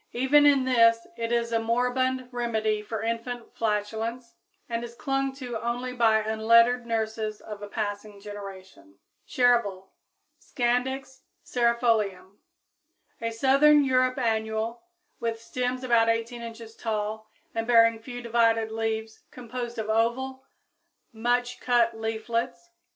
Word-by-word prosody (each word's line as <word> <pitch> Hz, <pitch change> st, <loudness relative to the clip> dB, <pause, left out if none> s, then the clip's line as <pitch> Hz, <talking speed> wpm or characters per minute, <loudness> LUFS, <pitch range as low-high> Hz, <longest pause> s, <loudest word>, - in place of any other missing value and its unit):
Even 280 Hz, +4 st, +5 dB
in 275 Hz, -2 st, +4 dB
this 230 Hz, -2 st, +4 dB
it 230 Hz, 0 st, -3 dB
is 235 Hz, -1 st, 0 dB
a 230 Hz, -, +2 dB
moribund 250 Hz, +3 st, 0 dB
remedy 220 Hz, -3 st, -1 dB
for 220 Hz, 0 st, -5 dB
infant 230 Hz, +1 st, -4 dB
flatulence, 225 Hz, +2 st, -2 dB, 0.3 s
and 235 Hz, 0 st, -3 dB
is 235 Hz, 0 st, -8 dB
clung 270 Hz, +1 st, -1 dB
to 245 Hz, -4 st, -5 dB
only 245 Hz, +2 st, -3 dB
by 230 Hz, -3 st, +4 dB
unlettered 230 Hz, +3 st, +3 dB
nurses 220 Hz, -1 st, -2 dB
of 210 Hz, -1 st, -9 dB
a 205 Hz, -, -6 dB
passing 205 Hz, -1 st, -4 dB
generation. 190 Hz, -, -10 dB, 0.3 s
=Chervil= 235 Hz, -7 st, +1 dB, 0.5 s
(Scandix 260 Hz, +2 st, -2 dB, 0.2 s
Cerefolium, 225 Hz, -6 st, 0 dB, 0.8 s
Linn.), 230 Hz, -, -1 dB
a -, -, -7 dB
southern 275 Hz, +5 st, +5 dB
Europe 255 Hz, -1 st, +2 dB
annual, 220 Hz, -1 st, -1 dB, 0.4 s
with 230 Hz, -1 st, -2 dB
stems 250 Hz, +2 st, -3 dB
about 235 Hz, -2 st, +3 dB
18 230 Hz, +1 st, -1 dB
inches 230 Hz, -1 st, -9 dB
tall 215 Hz, -1 st, -3 dB, 0.2 s
and 225 Hz, 0 st, -2 dB
bearing 230 Hz, -1 st, +5 dB
few 245 Hz, +1 st, -8 dB
divided 230 Hz, -1 st, +2 dB
leaves 220 Hz, 0 st, -3 dB
composed 240 Hz, -1 st, -6 dB
of 220 Hz, -1 st, -3 dB
oval, 245 Hz, +4 st, 0 dB, 0.7 s
much 245 Hz, +2 st, 0 dB
cut 235 Hz, -2 st, +2 dB
leaflets. 225 Hz, +8 st, -3 dB
230 Hz, 125 wpm, -27 LUFS, 220-245 Hz, 0.8 s, Even